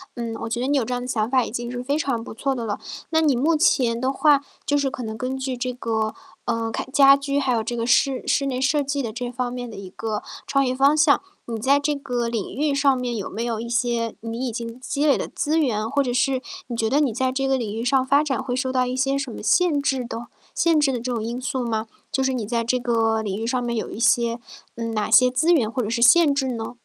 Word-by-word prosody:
嗯， 230 -1 -4
我 230 - -4
觉 235 +1 -2
得 255 - -1
你 285 0 +2
有 250 - +2
这 250 - -3
样 245 0 -3
想 220 -2 -1
法 255 -2 +3
已 - - -5
经 240 +1 -4
是 245 0 -4
非 280 +4 -1
常 245 -7 -1
不 - - -8
错 270 +4 -1
的 235 -3 -4
了。 205 - -3 0.3
那 320 0 +3
你 290 -5 +3
目 310 +6 +2
前 245 -7 +2
的 260 +1 0
话 285 0 +4 0.2
就 290 - +2
是 280 -1 +1
可 250 - -6
能 220 0 -5
根 255 +2 -3
据 265 -1 -3
这 250 +1 -2
个， 220 -3 -2 0.3
呃， 230 -1 -1
开 - - -3
家 275 -1 +7
居， 280 0 -1
还 265 -3 +1
有 225 -1 0
这 240 +1 -4
个 230 +1 -2
室 265 +1 +2
室 280 - +2
内 255 -1 -2
设 285 +2 +2
计 280 +1 -2
的 225 -3 -4
这 245 0 -4
方 250 0 -3
面 245 -1 -5
的 215 - -9
一 190 -2 -8
个 220 0 -3 0.2
创 275 -1 +2
业 255 0 -1
方 280 +3 +4
向。 295 -1 +4 0.2
你 230 -1 -4
在 275 +5 +3
这 295 +1 0
个 250 -4 -2
领 230 -4 -3
域 290 -1 0
上 280 -1 +3
面 245 -2 -3
有 200 - -4
没 225 +4 -4
有 230 -2 -2
一 235 - -5
些 235 -1 0
你 230 +3 -4
已 - - -2
经 230 +2 -6
积 280 +3 -1
累 280 - +4
的 - - -3
资 320 -1 -1
源， 225 -6 0
或 280 +1 +1
者 245 -2 -2
是 260 +1 +1 0.3
你 240 - -4
觉 225 -1 +1
得 290 - +3
你 280 -6 +2
在 255 +2 0
这 270 +1 -1
个 265 0 +2
领 215 -4 -3
域 230 - -3
上 260 +1 +2
发 280 +3 +4
展 275 -3 -2
会 250 -2 -2
受 260 0 -1
到 255 -1 +2
一 250 +1 -3
些 270 +1 +1
什 270 -3 -4
么 - - -8
限 290 - +3
制 265 -3 0
的 235 0 -6 0.3
限 330 -2 +3
制 285 -2 +3
的 245 - -2
这 245 +2 -4
种 225 -2 -2
因 240 +3 -4
素 255 -1 -2
吗？ 220 -1 -2 0.2
就 265 - 0
是 265 0 +1
你 230 -4 -2
在 230 +1 -1
这 250 +2 +1
个 225 -3 +1
领 195 -2 -3
域 230 - -2
上 250 0 0
面 235 -1 -2
有 220 - -3
一 220 - -7
些 235 0 +2 0.4
嗯， 230 -1 -4
哪 215 0 -1
些 250 +3 +6
资 315 +7 +2
源 235 -10 +3
或 255 - -1
者 215 - -3
是 235 0 -1
限 295 +2 +6
制 265 -2 0
呢？ 230 0 -5
250 Hz, 300 characters per minute, -23 LUFS, 230-275 Hz, 0.4 s, 家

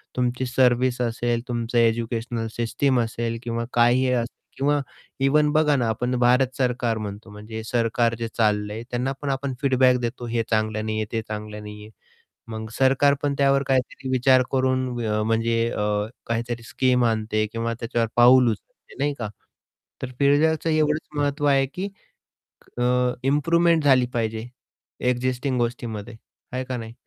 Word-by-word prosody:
तुमची 125 +1 -1
सर्व्हिस 125 0 +2
असेल, 120 0 -1
तुमचं 120 0 -2
एज्युकेशनल 115 0 0
सिस्टम 125 +2 +1
असेल 115 0 -2
किंवा 115 0 -3
काहीही 120 +2 +4
असेल. 120 0 -1 0.2
किंवा 145 +2 +2 0.4
इव्हन 150 +2 +3
बघा 150 -2 +3
ना, 120 -4 +1
आपण 125 +3 -1
भारत 125 +1 +3
सरकार 125 -3 0
म्हणतो 105 +1 -7
म्हणजे 110 +2 -8
सरकार 115 0 +1
जे 115 - -2
चाललंय 105 0 0
त्यांना 125 +2 -1
पण 145 - -3
आपण 135 0 -2
फीडबॅक 130 -2 +4
देतो, 120 0 -4
"हे 115 0 0
चांगलं 110 -1 0
नाही 110 0 -2
आहे, 110 - -1
ते 115 -1 -1
चांगलं 105 0 -6
नाही 105 0 -9
आहे." - - -13 0.6
मग 110 0 -5
सरकार 135 +2 +4
पण 145 -1 0
त्यावर 140 0 +3
काहीतरी 130 0 -1
विचार 130 0 +4
करून 130 -1 +1 0.2
अ, 105 0 0
म्हणजे 115 +1 +1
अ, 105 - -2 0.4
काहीतरी 115 0 -3
स्कीम 125 +1 +1
आणते 110 -1 0
किंवा 115 0 -2
त्याच्यावर 115 -1 -1
पाऊल 125 0 +6
उचलते 105 - -11
नाही 145 +1 +1
का. 110 -3 -3 0.7
तर 130 -1 -5
फीडबॅकचं 155 +3 +3
एवढंच 155 0 +1
महत्त्व 145 +1 0
आहे 135 -1 +4
की 195 +2 -3 0.9
अ, 120 - 0 0.4
इम्प्रूवमेंट 165 +3 +3
झाली 130 -3 +5
पाहिजे 110 0 -2 0.6
एक्झिस्टिंग 125 +1 -1
गोष्टीमध्ये 120 -2 -3 0.4
आहे 130 0 -2
का 130 -1 -4
नाही. 115 -1 -7
120 Hz, 155 wpm, -24 LUFS, 115-135 Hz, 0.9 s, पाऊल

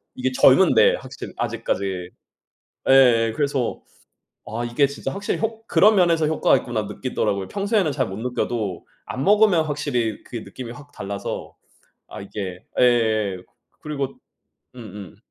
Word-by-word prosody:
이게 130 0 -1
젊은데 - - +5
확실히 - - -9
아직까지. 95 -2 -2 0.8
예 120 -4 +5
그래서 140 -5 -1 0.6
아 115 +3 -4
이게 120 +4 +2
진짜 140 +1 -5
확실히 200 +1 -3
효 225 0 -2
'그런 215 0 +5
면에서 170 -4 +3
효과가 155 0 +3
있구나.' - - -3
느끼더라고요. 100 -1 -2
평소에는 200 -5 0
잘 - - 0
못 95 - -6
느껴도 115 -5 -3 0.2
안 130 - -4
먹으면 205 -5 +4
확실히 125 -7 -2
그게 115 - -6
느낌이 125 0 -9
확 145 +3 -13
달라서 100 0 -6 0.5
아 - - -9
이게 95 -2 -7
예예예. 110 -5 +2 0.4
그리고 140 -3 -4 0.6
음음. 105 -4 -10
125 Hz, 305 characters per minute, -22 LUFS, 105-150 Hz, 0.8 s, 젊은데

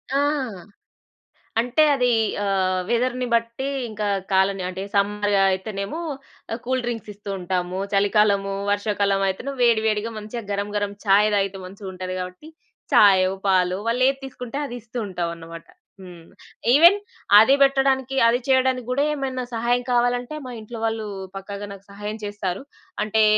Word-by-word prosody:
ఆ! - - +3 1.4
అంటే, 245 +6 +3
అదీ 250 -2 +2 0.3
ఆహ్, 185 -1 +1
వెదర్‌ని 250 +1 0
బట్టీ, 235 +3 0 0.2
ఇంకా 210 -1 -3 0.2
కాలని 190 0 +2
అంటే, 185 +1 -5
సమ్మర్ 205 +1 +1
ఆహ్, - - +5
అయితేనేమో 195 - -4 0.5
ఆహ్, 230 - -4
కూల్‌డ్రింక్సిస్తూ 230 -5 -3
ఉంటాము. 180 0 -2
చలికాలము, 200 0 +2 0.2
వర్షాకాలవయితెను 200 +3 0
వేడివేడిగా 220 -2 +2
మంచిగా 215 +3 -6
గరం‌గరం 205 0 -2
చాయ్ 205 +2 +5
దాగితే 195 -1 -1
మంచిగుంటది 185 -1 -7
గాబట్టి, 185 +12 -7 0.4
చాయో, 190 -2 +6 0.2
పాలో 185 -1 +3
వాళ్ళేది 255 +3 +2
తీసుకుంటే 250 0 -7
అది 245 - -6
ఇస్తూ 230 +3 -9
ఉంటావన్నమాట. 170 -2 -5 0.4
హ్మ్. 175 -3 -12 0.5
ఈవెన్ 340 +7 +7 0.4
అదీ 225 +6 +6
బెట్టడానికి, 270 -1 +2
అది 235 +1 +3
చెయడానికి 260 -2 +2
గూడా 275 +3 +2
ఏమైనా 260 -3 -3
సహాయం 240 +2 +1
కావాలంటే, 245 +3 +1
మా 250 - -6
ఇంట్లోవాళ్ళూ 225 -1 -3 0.3
పక్కాగా 200 +1 -7
నాకు 195 0 -14
సహాయం 210 +2 -6
చేస్తారు. 200 -3 -3 0.4
అంటే, 215 +1 +2
210 Hz, 125 wpm, -23 LUFS, 195-245 Hz, 1.4 s, ఈవెన్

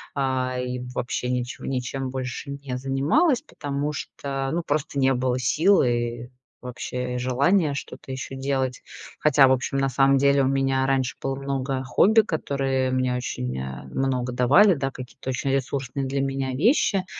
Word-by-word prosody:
а, 130 -2 0
и 125 0 -3
вообще 125 0 -2
ничего 125 -1 -3
ничем 130 0 -3
больше 130 +1 -5
не 140 -2 -5
занималась, 150 - +2
потому 145 - -4
что, 135 -1 -4
ну, 170 +2 -1
просто 145 -1 -1
не 135 0 +4
было 125 0 0
сил 165 +11 +4
и 120 -1 -1 0.3
вообще 125 0 -4
желания 140 +6 +2
что-то 135 - -7
ещё 130 0 -6
делать. 135 -2 -1 0.4
Хотя, 145 -2 +5
в - - +3
общем, 130 +1 0
на 135 0 +2
самом 135 +1 +3
деле 140 +1 +4
у 130 - +2
меня 135 0 +1
раньше 135 -2 0
было 135 0 -2
много 135 -1 -2
хобби, 215 - +4
которые 135 -7 -1
мне 130 -1 0
очень, 65 - -3
э, 65 0 -6
много 125 -2 -2
давали, 145 - +5
да, 135 -4 -2
какие-то 130 0 -9
очень 130 +1 -1
ресурсные 135 0 -2
для 135 +1 -1
меня 135 -1 -2
вещи. 195 - +2
135 Hz, 160 wpm, -24 LUFS, 125-140 Hz, 0.4 s, Хотя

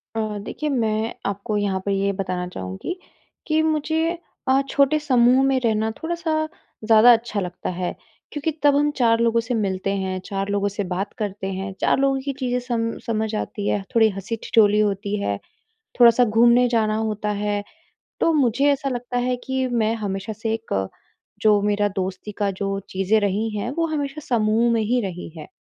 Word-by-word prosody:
अ, - - -1 0.2
देखिए, 300 +9 -4
मैं 225 -4 0
आपको 200 +2 -2
यहाँ 200 -2 0
पर 200 - 0
ये 195 0 +1
बताना 185 -2 -3
चाहूँगी 95 - -6 0.5
कि 310 -1 +2
मुझे 320 +2 0 0.3
अ, 265 +1 +4
छोटे 280 +2 +3
समूह 255 -2 +4
में 270 -1 +2
रहना 220 -2 +1
थोड़ा-सा 340 0 -3 0.5
ज़्यादा 225 +2 +7
अच्छा 225 -2 -1
लगता 180 -2 -4
है। 180 0 -3 0.4
क्योंकि 295 +2 -2
तब 290 -1 +5
हम 295 +1 +3
4 230 -3 +3
लोगों 230 0 +3
से 230 +2 -3
मिलते 195 -4 -1
हैं, 190 -1 -2
4 195 0 -3
लोगों 205 0 +1
से 205 +1 -3
बात 190 +2 -3
करते 205 -3 -3
हैं, 195 +1 -4
4 - - +3
लोगों 270 -1 +2
की 275 +1 -3
चीज़ें 250 -2 0
सम 235 -2 -2
समझ 220 -1 -1
आती 205 -1 -3
हैं, 200 - 0
थोड़ी 220 -1 +6
हँसी-ठिठोली 210 +1 +1
होती 205 0 0
है, 100 - -1 0.6
थोड़ा-सा 240 +1 +7
घूमने 235 +3 +5
जाना 220 -3 +1
होता 215 -1 -2
है। 205 -1 -1 0.6
तो 330 - +3
मुझे 275 -1 +3
ऐसा 275 0 -2
लगता 245 -1 -3
है 250 - +1
कि 265 0 0
मैं 225 -2 +1
हमेशा 200 -1 -4
से 220 +1 -3
एक 100 - -2 0.5
जो 210 -1 +4
मेरा 205 0 +1
दोस्ती 190 +2 -4
का 205 -2 +1
जो 195 0 -1
चीज़ें 195 +3 +2
रही 205 +2 0
हैं, 220 +4 -2
वो 330 +4 0
हमेशा 300 -2 -3
समूह 230 0 +2
में 230 - +2
ही 245 +4 +1
रही 185 -5 -5
हैं। 155 - -8
220 Hz, 180 wpm, -22 LUFS, 200-250 Hz, 0.6 s, ज़्यादा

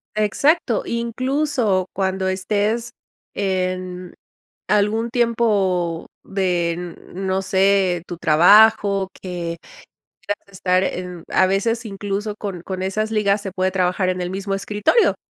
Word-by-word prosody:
Exacto, 235 - +2
incluso 235 -4 0
cuando 190 0 -1
estés 210 +5 -1 0.4
en 185 -2 -2 0.5
algún 215 +3 +1
tiempo 205 -8 +1 0.2
de 180 -3 0
n 175 0 -6 0.2
no 190 +1 -1
sé, 190 -2 +2
tu 175 - -7
trabajo 195 +4 +5
que 175 -2 -4 0.7
quieras 205 0 -4
estar 185 0 +1
en 180 -2 -4
a 185 - +4
veces 225 +5 0
incluso 205 +1 -4
con 190 -5 -5
con 185 0 -5
esas 215 +3 -1
ligas 210 -1 +1
se 195 - -5
puede 185 0 0
trabajar 185 0 +1
en 185 0 -2
el 175 - -3
mismo 195 +1 -3
escritorio. 210 - +2
195 Hz, 120 wpm, -21 LUFS, 185-215 Hz, 0.7 s, trabajo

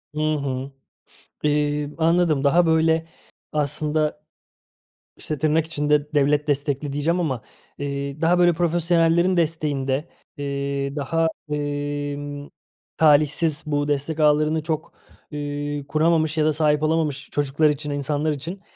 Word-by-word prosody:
Hı - - -3
hı. 135 -2 -3 0.7
Eee, 150 0 0
anladım, 165 -3 +2
daha 170 +5 +4
böyle 160 0 +2 0.5
aslında. 150 +1 -1 0.9
İşte, 155 - -4
tırnak 155 +2 +2
içinde 150 -1 0
"devlet 145 +1 +2
destekli" 145 0 -1
diyeceğim 165 +5 0
ama, 135 -9 -1 0.4
eee, 140 +1 -4
daha 175 +2 +3
böyle 175 -1 +5
profesyonellerin 170 +1 +2
desteğinde, 150 -3 0 0.3
eee, 140 0 -3
daha, 165 +3 0 0.2
emm, 145 0 -3 0.5
talihsiz, 150 0 +3
bu 145 -1 -1
destek 145 +2 -2
ağlarını 155 +1 +3
çok, 155 -1 -3 0.4
eee, 145 -1 -4
kuramamış 160 +1 +2
ya 155 - +3
da 155 - +3
sahip 150 0 +2
olamamış 155 -3 0
çocuklar 145 +2 +1
için, 150 0 -3
insanlar 145 +2 -1
için, 165 +7 -5
150 Hz, 120 wpm, -23 LUFS, 145-160 Hz, 0.9 s, böyle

